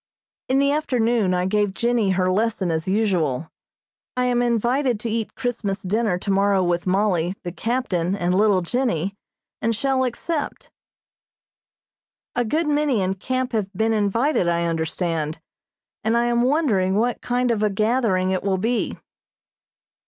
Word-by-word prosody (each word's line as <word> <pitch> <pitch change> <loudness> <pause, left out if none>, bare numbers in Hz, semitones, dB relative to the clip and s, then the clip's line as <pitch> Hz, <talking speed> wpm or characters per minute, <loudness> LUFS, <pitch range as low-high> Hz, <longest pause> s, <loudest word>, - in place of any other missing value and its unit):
In 260 - +3
the 280 +1 +3
afternoon 235 -9 +1
I 180 0 0
gave 205 0 0
Jennie 235 -4 +1
her 185 -1 +2
lesson 210 -3 0
as 160 +2 -2
usual. 175 - 0 0.7
I 250 - +2
am 245 -1 +2
invited 240 +1 +1
to 230 - -2
eat 225 -1 -3
Christmas 220 -6 -3
dinner 205 0 0
tomorrow 195 0 +2
with 175 0 0
Mollie, 185 -2 +1
the 175 - -4
captain 190 -3 -1
and 180 -2 0
little 200 -1 +3
Jennie, 200 -3 -1 0.5
and 230 0 +1
shall 265 +3 +1
accept. 290 +5 -3 1.6
A 245 - +2
good 310 +9 0
many 290 -8 +1
in 185 +1 0
camp 255 +6 -2
have 210 -5 -1
been 220 +4 +1
invited, 220 - +1
I 170 0 +1
understand, 160 -1 -2 0.6
and 225 +2 +2
I 235 - +2
am 240 0 +2
wondering 240 - +2
what 235 +3 0
kind 245 0 0
of 220 -3 0
a 210 - +3
gathering 215 -3 +1
it 185 - 0
will 195 -1 0
be. 230 +5 -1
210 Hz, 150 wpm, -22 LUFS, 185-245 Hz, 1.6 s, In